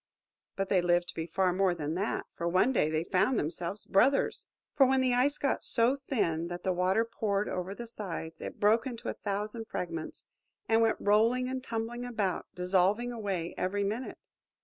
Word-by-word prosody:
But 195 Hz, 0 st, -2 dB
they 185 Hz, -3 st, +4 dB
lived 175 Hz, 0 st, +2 dB
to -, -, -6 dB
be 165 Hz, 0 st, -4 dB
far 185 Hz, +1 st, +1 dB
more 185 Hz, -1 st, +2 dB
than 155 Hz, -2 st, -3 dB
that, 195 Hz, +5 st, -2 dB
for 170 Hz, -, -2 dB
one 185 Hz, +9 st, +3 dB
day 155 Hz, -, +2 dB
they 155 Hz, +1 st, 0 dB
found 195 Hz, +8 st, +2 dB
themselves 170 Hz, +5 st, -2 dB
brothers! 260 Hz, +8 st, +2 dB, 0.3 s
For 275 Hz, -3 st, +6 dB
when 265 Hz, 0 st, +3 dB
the 255 Hz, -1 st, +2 dB
Ice 270 Hz, +4 st, +2 dB
got 275 Hz, -, -1 dB
so 240 Hz, +3 st, +3 dB
thin 170 Hz, -, 0 dB
that 175 Hz, 0 st, -6 dB
the 185 Hz, -, +1 dB
water 185 Hz, +5 st, +2 dB
poured 210 Hz, -3 st, -1 dB
over 185 Hz, +2 st, -3 dB
the 240 Hz, -, -7 dB
sides, 190 Hz, -8 st, -6 dB
it -, -, -7 dB
broke 225 Hz, +4 st, +3 dB
into 235 Hz, -3 st, -5 dB
a -, -, -2 dB
thousand 210 Hz, +3 st, -3 dB
fragments, 165 Hz, -5 st, -5 dB, 0.4 s
and 225 Hz, 0 st, +4 dB
went 225 Hz, -1 st, +3 dB
rolling 230 Hz, +5 st, +3 dB
and 260 Hz, 0 st, -4 dB
tumbling 230 Hz, +1 st, -4 dB
about, 215 Hz, -7 st, -2 dB
dissolving 190 Hz, +6 st, +2 dB
away 195 Hz, -7 st, -3 dB
every 200 Hz, +2 st, 0 dB
minute. 220 Hz, +6 st, -3 dB
205 Hz, 190 wpm, -30 LUFS, 180-235 Hz, 0.4 s, For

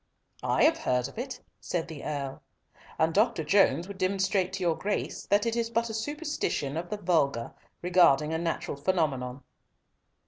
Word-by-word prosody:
"I -, -, +2 dB
have 320 Hz, +1 st, +5 dB
heard 125 Hz, -, +1 dB
of -, -, -9 dB
it," 250 Hz, 0 st, -5 dB, 0.2 s
said 175 Hz, -2 st, -2 dB
the 160 Hz, -4 st, -8 dB
Earl, 140 Hz, -3 st, -4 dB, 0.6 s
"and 160 Hz, +1 st, +2 dB
Dr. 215 Hz, -3 st, +2 dB
Jones 170 Hz, -1 st, +3 dB
would 200 Hz, -1 st, -9 dB
demonstrate 190 Hz, 0 st, +1 dB
to 190 Hz, -1 st, -3 dB
your 170 Hz, -2 st, +2 dB
Grace 205 Hz, +4 st, -3 dB
that 205 Hz, +2 st, +3 dB
it 230 Hz, 0 st, 0 dB
is 230 Hz, -1 st, 0 dB
but 230 Hz, 0 st, 0 dB
a -, -, -6 dB
superstition 290 Hz, -, -2 dB
of 170 Hz, +2 st, -4 dB
the 210 Hz, -, -3 dB
vulgar 150 Hz, -, +1 dB, 0.3 s
regarding 165 Hz, -4 st, +4 dB
a 160 Hz, -, 0 dB
natural 165 Hz, -4 st, -2 dB
phenomenon." 140 Hz, -6 st, -1 dB
180 Hz, 170 wpm, -28 LUFS, 150-210 Hz, 0.6 s, have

